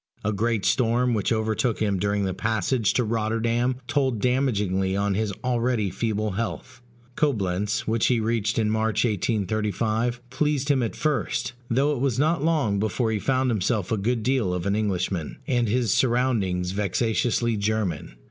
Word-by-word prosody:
A 105 - 0
great 110 -1 0
storm 120 +3 +2
which 105 -1 0
overtook 110 +1 0
him 100 -3 0
during 100 +1 0
the 95 - -1
passage 110 +3 0
to 125 - +2
Rotterdam 115 +3 0
told 130 -4 0
damagingly 105 -7 +1
on 100 0 +1
his 105 +1 -1
already 120 -5 0
feeble 110 +1 -1
health. 95 0 -5 0.3
Coblentz, 105 -8 0
which 115 0 +2
he 120 -2 +2
reached 110 -1 0
in 110 -2 +2
March, 110 +1 +1
1835, 110 +3 -1
pleased 145 +1 0
him 140 -3 +3
at 115 - -2
first; 150 -4 -1 0.2
though 135 +5 +2
it 140 - -3
was 135 -4 +1
not 155 +1 +1
long 150 -12 +1
before 110 +2 0
he 110 - 0
found 130 +2 +1
himself 105 -2 -1
a 110 - +2
good 115 +3 -1
deal 120 -8 +1
of 90 - -4
an 100 0 +1
Englishman, 95 -6 -2
and 120 -2 +1
his 115 -1 +1
surroundings 115 -8 +1
vexatiously 110 +4 0
German. 100 - -2
110 Hz, 160 wpm, -25 LUFS, 100-125 Hz, 0.3 s, him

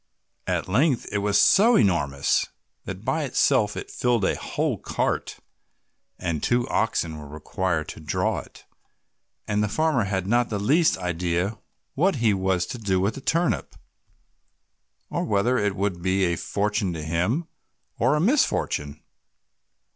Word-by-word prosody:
At - - -1
length 125 - +2
it 105 - 0
was 100 0 +2
so 225 +5 +6
enormous 70 - +2 0.4
that 95 +3 -7
by 160 -1 0
itself 130 -5 +2
it - - -6
filled 120 -5 +1
a - - +1
whole - - -2
cart, - - -2 0.8
and 85 -5 -2
two 120 0 +1
oxen 85 -8 -1
were 75 - -9
required 80 +2 -2
to - - -8
draw 75 -1 -1
it, - - -14 0.8
and 105 0 0
the 105 - -1
farmer 155 -3 +1
had 95 -1 -2
not 120 +4 +2
the 105 - -2
least 145 - +3
idea 90 +3 -2 0.3
what 185 +6 +2
he 115 -5 +2
was 95 -2 0
to 120 - -7
do 95 -4 0
with 100 +4 +1
the 135 - -8
turnip, 165 +4 0 1.4
or - - -1
whether 110 +5 +1
it 105 -1 0
would 100 -3 -2
be 95 +2 +1
a 85 -2 +1
fortune 105 +1 -1
to 80 -2 -5
him 90 - -1 0.5
or 130 +6 +3
a - - +1
misfortune. 150 - 0
100 Hz, 150 wpm, -24 LUFS, 90-125 Hz, 1.4 s, so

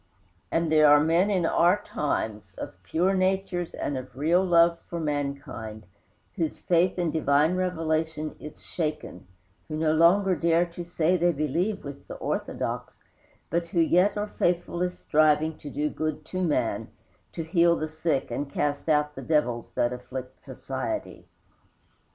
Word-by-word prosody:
And 165 -1 +1
there 155 -1 +6
are 145 0 +7
men 165 +6 +3
in 185 -4 +1
our 175 +4 +3
times, 105 - -3
of 90 -1 -8
pure 170 - +1
natures 185 -2 0
and 145 - -3
of 130 -1 -11
real 165 +6 +3
love 170 -2 +4
for 170 - -4
mankind, 140 -8 -4 0.5
whose 165 -4 -1
faith 175 +1 +2
in 175 -3 0
divine 155 +2 +2
revelation 160 -3 -1
is 150 - -10
shaken, 150 - -4 0.4
who 155 - -4
no 155 0 +2
longer 185 +4 +4
dare 170 +2 +2
to 170 0 -8
say 170 +1 +1
they 175 +1 +3
believe 170 +7 -1
with 140 0 -9
the - - -7
"orthodox," - - -4 0.5
but 170 0 0
who 170 - -1
yet 180 +5 +3
are 205 0 -3
faithfully 175 0 +1
striving 155 -2 +2
to 145 - -8
do 150 +2 -1
good 155 0 -3
to 185 +3 -4
man, 165 -5 0 0.5
to 165 - -4
heal 170 +1 +3
the 155 - -3
sick 155 -4 -1
and 140 +4 -3
cast 145 +2 -1
out 150 -1 +2
the - - -8
devils 125 -7 0
that 120 +1 +1
afflict 130 +1 -8
society. - - -5
160 Hz, 155 wpm, -26 LUFS, 150-175 Hz, 0.5 s, are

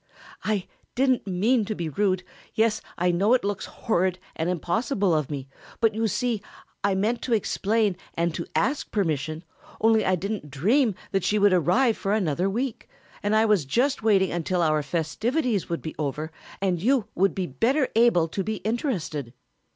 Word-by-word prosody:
"I 210 -3 -1 0.3
didn't 260 -3 +2
mean 215 +6 +2
to 215 - -3
be 170 -3 -3
rude; 185 +3 0 0.3
yes, 220 0 +2 0.2
I 180 0 +2
know 200 +8 +3
it 250 - 0
looks 200 -1 -2
horrid 185 -4 0 0.2
and 160 +2 -1
impossible 190 - 0
of 150 -4 0
me, 140 -3 -5 0.3
but 225 -2 +3
you 225 +1 0
see 235 0 -1 0.4
I 200 -1 +2
meant 220 +5 0
to 240 - +1
explain 210 -1 +1 0.2
and 170 0 0
to 170 - -4
ask 275 +6 0
permission, 155 -4 -1 0.4
only 220 0 +4
I 185 - +2
didn't 195 -3 -4
dream 210 - +2 0.2
that 195 -2 0
she 210 - +2
would 205 -2 +5
arrive 210 - +3
for 195 - -1
another 185 -3 +1
week, 235 +4 -3 0.3
and 205 +1 +1
I 220 +1 +4
was 210 -7 +3
just 250 - +1
waiting 200 -4 +3
until 175 +1 0
our 155 -1 +2
festivities 205 - -1
would 170 - -3
be 155 - -5
over 150 +2 -3 0.3
and 185 -4 0
you 250 +1 +2
would 195 +2 +2
be 190 - -1
better 255 - +1
able 225 -8 +4
to 195 - -2
be 215 +3 -2
interested." 185 - -2
200 Hz, 175 wpm, -25 LUFS, 170-225 Hz, 0.4 s, would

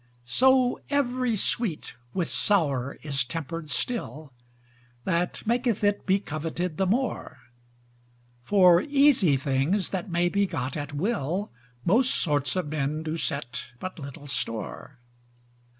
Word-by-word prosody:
So 255 - +3
every 255 -4 +1
sweet 205 -4 -1 0.2
with 180 -3 -1
sour 140 -10 +1
is 140 -2 0
tempered 165 +3 -5
still 155 - -2 0.7
That 180 -1 -1
maketh 235 -1 +1
it 205 0 +1
be 190 +1 +4
coveted 165 0 -4
the 190 - +1
more: 235 - -1 1.0
For 180 +3 +5
easy 275 - +4
things 140 +8 0
that 190 +1 -3
may 175 0 +2
be 200 +2 +1
got 130 -6 -3
at 145 -1 -4
will, 180 - -1 0.3
Most 240 +8 +3
sorts 145 -2 0
of 180 -5 -1
men 155 +1 -2
do 160 0 -3
set 140 -7 -3
but 185 +5 -7
little 140 0 -9
store. 125 0 -4
170 Hz, 125 wpm, -26 LUFS, 145-210 Hz, 1.0 s, For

